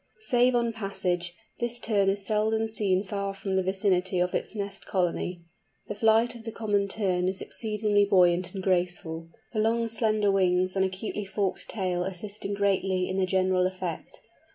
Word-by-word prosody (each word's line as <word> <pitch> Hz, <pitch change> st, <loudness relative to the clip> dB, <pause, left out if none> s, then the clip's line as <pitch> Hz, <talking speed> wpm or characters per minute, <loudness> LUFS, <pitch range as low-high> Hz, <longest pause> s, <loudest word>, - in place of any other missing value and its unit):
Save 250 Hz, -, +3 dB
on 235 Hz, -1 st, +1 dB
passage, 180 Hz, -4 st, -2 dB, 0.2 s
this 240 Hz, 0 st, -2 dB
Tern 200 Hz, -4 st, +2 dB
is 195 Hz, 0 st, 0 dB
seldom 220 Hz, +2 st, +1 dB
seen 205 Hz, -4 st, 0 dB
far 200 Hz, 0 st, -3 dB
from 195 Hz, 0 st, -3 dB
the 190 Hz, -, +3 dB
vicinity 190 Hz, -1 st, +1 dB
of 180 Hz, 0 st, +1 dB
its -, -, -2 dB
nest 200 Hz, -1 st, -5 dB
colony. 180 Hz, -1 st, -1 dB, 0.5 s
The -, -, -1 dB
flight 225 Hz, +2 st, +3 dB
of 235 Hz, -2 st, -11 dB
the 225 Hz, -, -5 dB
Common 205 Hz, -3 st, 0 dB
Tern 185 Hz, -3 st, 0 dB
is 190 Hz, 0 st, 0 dB
exceedingly 210 Hz, -2 st, +1 dB
buoyant 180 Hz, -2 st, +3 dB
and 190 Hz, -, -4 dB
graceful, 175 Hz, -3 st, -1 dB, 0.2 s
the 215 Hz, -, -1 dB
long 230 Hz, +2 st, +2 dB
slender 215 Hz, -2 st, +1 dB
wings 185 Hz, -1 st, +2 dB
and 190 Hz, -, +2 dB
acutely 190 Hz, +2 st, -3 dB
forked 195 Hz, 0 st, -1 dB
tail 185 Hz, -4 st, -1 dB
assisting 200 Hz, +2 st, -4 dB
greatly 190 Hz, -2 st, +1 dB
in 190 Hz, -, -3 dB
the 190 Hz, -1 st, +1 dB
general 185 Hz, -1 st, +2 dB
effect. 185 Hz, -3 st, -6 dB
195 Hz, 170 wpm, -27 LUFS, 185-215 Hz, 0.5 s, Save